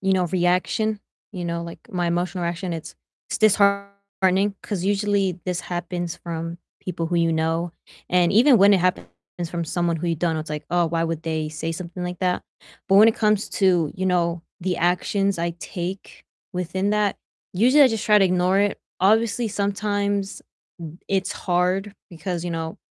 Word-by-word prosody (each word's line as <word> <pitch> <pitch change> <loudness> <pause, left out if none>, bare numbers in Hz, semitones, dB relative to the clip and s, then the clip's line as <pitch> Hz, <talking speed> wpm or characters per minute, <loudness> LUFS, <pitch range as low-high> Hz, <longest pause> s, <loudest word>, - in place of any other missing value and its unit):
you 195 0 +1
know, 185 -1 +2
reaction, 185 +4 +1 0.3
you 180 -3 -5
know, 170 0 -2
like 170 0 -8
my 175 -2 -1
emotional 175 +1 -1
reaction, 175 +1 -3
it's 160 -1 -6 0.4
it's - - -2
disheartening, 200 -1 +2
'cause 190 -4 -3
usually 200 -2 +1
this 180 -1 -1
happens 175 -1 -4
from 165 0 -5 0.2
people 170 -2 -3
who 175 +1 -1
you 165 -1 +2
know, 165 +1 0 0.4
and 175 -1 +3
even 245 +4 +6
when 200 +1 +7
it 190 - +2
happens 180 - 0 0.4
from 170 -1 -2
someone 170 +1 0
who 170 +2 -4
you 170 - +1
don't 165 +1 0
know, 160 - -1
it's 155 - -8
like, 150 -1 -5
"Oh, 175 -1 +3
why 165 0 0
would 165 -1 -3
they 160 -1 -2
say 155 +2 -4
something 175 +1 -6
like 180 0 -4
that?" 180 -1 0 0.5
But 195 - +5
when 215 +3 +8
it 225 - +2
comes 210 -1 +1
to, 175 -6 +3
you 185 - -2
know, 170 -2 +1 0.2
the 180 0 -1
actions 190 +2 +1
I 170 +1 0
take 185 +2 -6 0.3
within 180 +2 -1
that, 210 -2 +1 0.4
usually 255 +10 +5
I 260 - +6
just 225 -2 -2
try 210 -1 +6
to 195 - +4
ignore 185 +1 +2
it. 205 0 +1 0.2
Obviously, 225 +4 +3
sometimes, 200 -1 -1 0.4
mm, 160 +1 -10
it's 190 -1 0
hard 185 +3 0 0.2
because, 175 0 -4
you 175 - -3
know, 160 -1 -4
180 Hz, 185 wpm, -23 LUFS, 170-200 Hz, 0.5 s, when